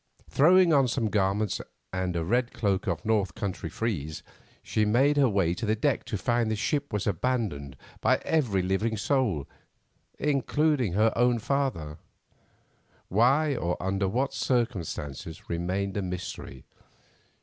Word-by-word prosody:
Throwing 175 +3 +5
on 135 -3 +5
some 115 -3 -1
garments, 100 0 +1 0.3
and 95 -1 -1
a 85 -1 -1
red 120 +6 +1
cloak 100 -2 0
of 85 +3 -2
North 105 -5 +1
country 100 -6 -4
frieze, 80 -6 -3 0.4
she 110 - 0
made 130 +8 +3
her 140 -3 +4
way 95 -5 +1
to 90 - -7
the 110 0 +2
deck 130 +3 0
to 105 - -3
find 120 +2 +1
that - - 0
the - - 0
ship 145 +6 -1
was 105 -2 -2
abandoned 90 - -2 0.2
by - - +3
every 120 - +1
living 105 +4 0
soul, 105 - 0 0.7
including 145 - +1
her 110 +3 +3
own 120 0 +3
father; 115 - -2 1.1
why, 135 +8 +3
or 90 -6 -1
under 95 +1 0
what 130 +8 0
circumstances, 95 - -2
remained 95 +3 -2
a 100 - 0
mystery. 90 -7 -6
105 Hz, 145 wpm, -27 LUFS, 95-125 Hz, 1.1 s, Throwing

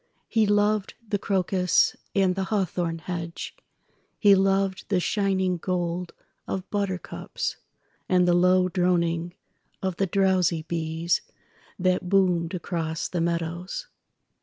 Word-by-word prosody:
He 220 -2 +2
loved 205 0 +2
the 205 -1 -1
crocus 185 -2 +2 0.2
and 190 -2 +3
the 190 +1 -2
hawthorn 180 -5 -1
hedge, 170 0 -5 0.6
He 205 -2 +6
loved 195 0 +2
the 195 -3 +2
shining 190 -1 +1
gold 175 0 -2 0.3
of 190 -1 -3
buttercups, 200 -3 -3 0.5
And 180 -1 +4
the 175 - +4
low 180 +1 +4
droning 175 -1 0 0.5
of 190 -2 -1
the 195 - +1
drowsy 185 -4 +2
beesThat 170 +3 -2
boomed 180 -2 +2
across 165 -2 -3
the 175 - -1
meadows. 170 - -2
180 Hz, 110 wpm, -26 LUFS, 170-195 Hz, 0.6 s, He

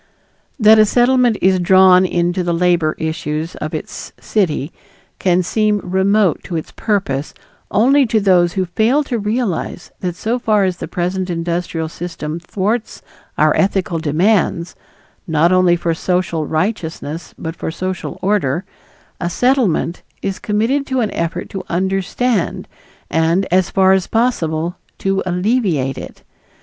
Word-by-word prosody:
That 215 0 +7
a 215 - +7
Settlement 245 -1 +3
is 185 0 +4
drawn 185 0 +5
into 175 +1 0
the 175 -1 0
labor 170 -3 +2
issues 160 0 -3
of - - -4
its - - -7
city 170 -7 -1 0.5
can 180 -1 +2
seem 210 +2 +1
remote 190 0 +1
to 175 - -5
its 160 - -4
purpose 185 -10 -2 0.3
only 265 +5 +4
to 220 0 +2
those 180 -4 +3
who 190 -1 0
fail 225 - +1
to 245 -4 -3
realize 210 -5 -2
that 180 -2 -3
so 225 +6 -2
far 215 -3 +2
as 185 -2 0
the - - -6
present 180 +1 -2
industrial 170 -1 -2
system 165 -1 -6
thwarts 210 +6 -3 0.3
our - - +3
ethical 190 -3 0
demands, 170 +2 +1 0.5
not 160 +1 +3
only 185 -1 +4
for 170 -1 -1
social 170 -2 -1
righteousness 160 -3 -3
but 160 0 -5
for - - -4
social 185 +2 -4
order, 185 -4 0 0.5
a 175 - -2
Settlement 220 - +1 0.2
is 195 -1 -3
committed 235 +6 0
to 260 -2 0
an 215 - -1
effort 170 +1 -3
to 195 - -4
understand 195 +4 -1 0.4
and, 165 +4 +2
as 185 0 +3
far 190 -1 +4
as 190 -1 +1
possible, 175 -8 0 0.2
to 195 0 0
alleviate 180 - 0
it. - - -10
185 Hz, 140 wpm, -17 LUFS, 170-210 Hz, 0.5 s, That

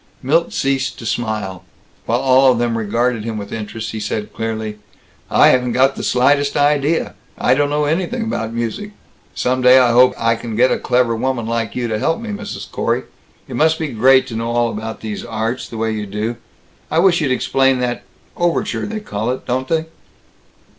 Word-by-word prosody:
Milt 160 +6 +2
ceased 135 -1 -1
to 115 - -9
smile. 105 -5 -3 0.4
While 120 +2 +1
all 130 0 +5
of 125 - 0
them 120 -1 0
regarded 115 +1 0
him 110 -1 -4
with 100 -1 -7
interest 110 0 -5
he 110 - -5
said 105 0 -4
clearly, 110 -1 -4 0.5
"I - - +6
haven't 125 -1 +2
got 135 +1 +3
the - - -5
slightest 140 +3 +2
idea. 145 +2 +1 0.2
I 125 - +3
don't 145 +2 +1
know 150 0 0
anything 185 +10 -1
about 115 - -3
music. 120 - -4 0.4
Some 130 +1 0
day 125 +1 +7
I 125 -2 +5
hope 125 +2 +5
I 115 0 +2
can 115 -1 -6
get 125 +3 +4
a - - +1
clever 125 -2 +1
woman 120 0 -1
like 115 -2 -2
you 125 -1 -1
to 110 -2 -2
help 165 +8 0
me, 230 -1 -7
Mrs. 205 - -7
Corey. - - -1 0.4
It 130 - -7
must 160 +4 +3
be 160 -2 -3
great 130 +3 +4
to 115 - -7
know 115 +1 -2
all 120 0 +1
about 110 +1 -5
all - - -24
these 110 -2 -5
arts, 115 +2 -3
the 115 - -7
way 110 0 -1
you 105 -1 -4
do. 105 +4 -3 0.5
I 160 - -1
wish 175 -1 +4
you'd 145 - 0
explain 135 +1 +2
that 120 -1 -2 0.3
overture 175 +4 -1
they 215 0 -4
call 110 - -3
it, 130 - -3
don't 130 +1 -1
they?" 160 +1 0
125 Hz, 200 wpm, -18 LUFS, 115-140 Hz, 0.5 s, day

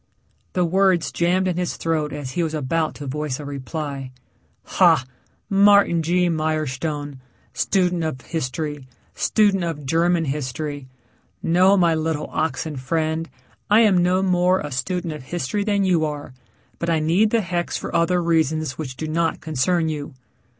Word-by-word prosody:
The 180 -1 +2
words 185 0 +2
jammed 180 +2 +1
in 180 -2 -1
his 180 -1 -2
throat 155 -2 -1
as 145 -3 -5
he 175 - -1
was 160 -1 -1
about 155 +2 -1
to 145 - -8
voice 145 0 -3
a 145 - -7
reply. 140 -1 -5 0.5
"Ha 125 - +3 0.4
Martin 200 -3 +5
G. 175 +2 +2
Mirestone, 155 -3 -2 0.3
student 180 -3 +1
of 155 -5 -3
history, 145 -2 -4 0.3
student 205 -4 +2
of 160 -4 -4
German 165 +3 +2
history. 145 0 -4 0.6
No 185 +4 +4
my 170 -3 +4
little 160 -1 -2
oxen 155 -1 -2
friend. 160 +4 -1 0.4
I 210 +2 +6
am 200 -5 +4
no 180 +2 +2
more 180 0 +3
a 150 - -6
student 170 +5 -2
of 150 - -8
history 175 +6 -2
than 200 -1 +1
you 180 -4 +2
are, 150 -3 -4 0.5
but 170 - -2
I 165 - +3
need 170 +8 +3
the 230 +1 +2
hex 175 -2 -2
for - - -6
other 175 +1 +2
reasons 155 -4 0
which 130 -5 -5
do 155 - -4
not 165 +1 0
concern 160 +3 0
you." 145 -3 -5
160 Hz, 155 wpm, -22 LUFS, 150-180 Hz, 0.6 s, I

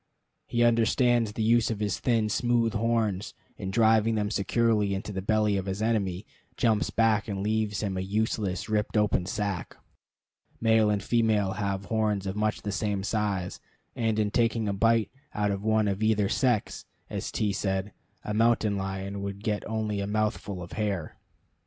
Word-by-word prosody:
He 120 0 +1
understands 120 -1 +3
the 110 - -2
use 115 +1 +3
of 110 -3 -3
his 105 -3 -1
thin, 115 -3 +1
smooth 120 0 +1
horns, 110 -3 0 0.2
and, 95 - -4
driving 110 0 +3
them 105 -1 -1
securely 105 -1 +1
into 95 +2 -5
the 95 - -3
belly 105 0 +2
of 95 0 -3
his 95 +1 -3
enemy, 105 -4 0 0.3
jumps 110 -3 +2
back 110 -2 +2
and 100 -2 -3
leaves 110 -1 0
him 100 -2 -2
a - - -1
useless, 100 -1 -1
ripped 110 0 0
open 105 -4 +2
sack. 100 -4 -3 0.8
Male 110 -1 +4
and 105 -2 0
female 110 -4 +2
have 100 0 -2
horns 105 -3 0
of 95 0 -3
much 105 0 -1
the 105 - -2
same 100 -1 -1
size; 100 -4 -2 0.4
and 115 -2 0
in 105 -1 +1
taking 115 -1 +1
a 100 - 0
bite 115 +1 +2 0.2
out 105 -1 +1
of 100 0 -3
one 110 -1 +2
of 100 +1 -1
either 110 -2 +2
sex, 120 -1 0 0.2
as - - -4
T 105 -2 0
said, 95 0 -2 0.3
a 105 - -3
mountain 110 -2 +2
lion 95 +1 -4
would 100 +1 -5
get 105 -2 -1
only 110 -2 -2
a 100 - -2
mouthful 105 -3 -2
of 85 - -11
hair. 100 -7 -2
105 Hz, 175 wpm, -27 LUFS, 100-110 Hz, 0.8 s, Male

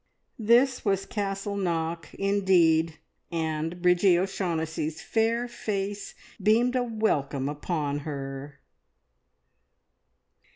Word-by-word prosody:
This 240 +4 +4
was 195 -2 +1
Castle 200 -1 -3
Knock 165 -4 -2
indeed, 175 -5 +3 0.3
and 165 +1 -2
Bridgie 180 0 +5
O'Shaughnessy's 165 -4 -2
fair 230 +2 0
face 205 -3 -4 0.3
beamed 230 +5 +3
a 255 - +3
welcome 155 - 0
upon 145 -1 -2
her. 140 -1 -6
180 Hz, 85 wpm, -27 LUFS, 160-205 Hz, 0.3 s, Bridgie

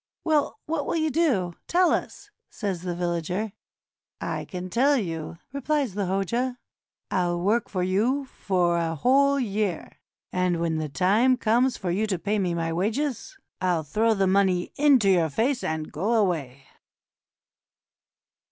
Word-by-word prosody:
"Well, 305 -4 +1
what 310 -2 -2
will - - -1
you 315 -1 +1
do? 250 - +1
Tell 360 0 +3
us," - - -3 0.2
says 195 -6 -4
the 175 -1 -3
villager. 175 +4 -2 0.7
"I'll - - -4
tell 230 +10 +1
you," 165 -6 -4 0.2
replies 280 -4 -1
the 200 -1 -2
Hoja; 235 +7 -1 0.5
"I'll 175 -2 0
work 210 +7 +1
for 185 -3 -1
you 230 +10 +1
for 180 -8 0
a 165 -1 -1
whole 280 - +3
year, 205 - -2 0.3
and 180 -2 0
when 165 -1 0
the 155 -1 -3
time 210 - +3
comes 245 +3 +2
for 180 -3 -3
you 210 +5 0
to 190 -3 -1
pay 205 +4 -1
me 180 -3 0
my 165 -1 -1
wages, 250 - -2 0.2
I'll 175 -3 +1
throw 220 +9 +1
the 195 -1 +2
money 190 -2 +2
into 275 -7 +4
your 175 -4 +3
faces 245 - 0
and 160 -1 -3
go 200 +10 -1
away." 150 - -1
195 Hz, 150 wpm, -25 LUFS, 175-250 Hz, 0.7 s, into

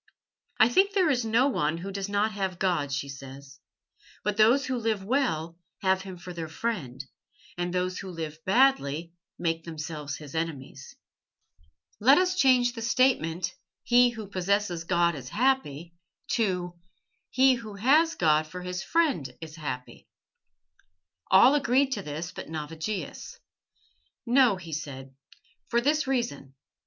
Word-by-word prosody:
"I 220 - +7
think 385 +11 +3
there 370 -6 +3
is 250 -3 +1
no 230 +4 +3
one 160 - 0
who 190 +4 -6
does 195 0 -4
not 205 +2 +1
have 190 -3 -3
God," 175 -7 0
she 140 0 -2
said. 135 0 -9 0.8
"But 210 -1 -1
those 235 +6 +4
who 260 -1 -2
live 220 -4 -1
well 180 - -1 0.2
have 190 0 +2
Him 190 -2 -8
for 180 +1 -9
their 165 -2 -5
friend, 155 - -4 0.5
and 175 0 -2
those 180 0 -1
who 195 - -7
live 160 -2 -7
badly 175 - +2 0.2
make 165 -1 -1
themselves 150 -3 -6
His 150 -3 -11
enemies. 160 -5 -5 1.0
Let 265 +7 +6
us 365 0 +2
change 255 -7 +4
the 230 - -7
statement, 225 -9 +1 0.3
'He 245 +1 +5
who 225 -3 -7
possesses 190 -2 -1
God 170 -1 +2
is 130 -5 -8
happy' 190 - 0 0.4
to 180 -6 -1 0.5
'He 265 0 +4
who 225 -4 -6
has 300 +10 +3
God 155 -2 +2
for 180 +3 -8
his 180 0 -4
friend 280 - 0
is 160 -1 -9
happy.'" 130 -6 -7 1.2
All 220 +8 +7
agreed 275 -1 +2
to 210 - -2
this 160 +1 -5
but - - -9
Navigius. 160 +3 -5 0.9
"No," 245 -3 +4
he 170 -3 -9
said, 135 -3 -6 0.5
"for 235 - +2
this 295 +3 +1
reason. 235 - -2
185 Hz, 145 wpm, -27 LUFS, 160-245 Hz, 1.2 s, I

